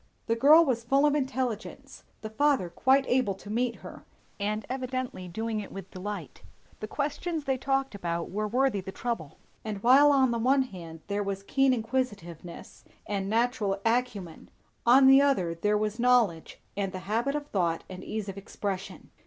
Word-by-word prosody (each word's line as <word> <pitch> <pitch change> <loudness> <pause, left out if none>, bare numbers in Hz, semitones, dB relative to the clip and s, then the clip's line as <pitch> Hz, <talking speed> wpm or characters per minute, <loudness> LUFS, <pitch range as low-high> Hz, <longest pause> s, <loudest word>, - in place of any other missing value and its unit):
The 230 - +1
girl 300 +8 +7
was 240 -5 -1
full 275 +5 +3
of 295 - +3
intelligence, 260 -6 -3 0.2
the 220 - -6
father 270 -7 +1
quite 265 +8 +3
able 245 -6 +1
to 205 +2 -10
meet 235 +1 0
her, - - -10 0.4
and 210 +1 -2
evidently 255 -7 -4
doing 220 +4 -3
it 205 - -7
with 195 -1 -9
delight; 185 -4 -7 0.4
the 215 - -5
questions 300 +5 -3
they 270 -2 0
talked 270 0 0
about 170 -4 -3
were 210 +2 -2
worthy 245 -2 +1
the 190 +1 -7
trouble; 230 - -4 0.3
and 210 -3 -5
while 275 +4 +7
on 265 -3 +3
the 235 - -1
one 265 +3 +3
hand 170 -8 -10
there 205 0 -2
was 195 -1 -4
keen 270 +5 +2
inquisitiveness 220 -9 -4 0.2
and 195 -1 -3
natural 220 -3 0
acumen, 225 -8 -2 0.4
on 265 +3 +7
the 270 +1 +8
other 195 -13 +1
there 210 +5 +1
was 215 +2 -2
knowledge 235 -9 +2 0.2
and 195 -2 -2
the 185 - -4
habit 235 +7 0
of 295 -1 -3
thought 170 -4 0
and 185 0 -9
ease 215 -2 -4
of 195 0 -6
expression. 195 -1 -6
225 Hz, 175 wpm, -28 LUFS, 195-260 Hz, 0.4 s, the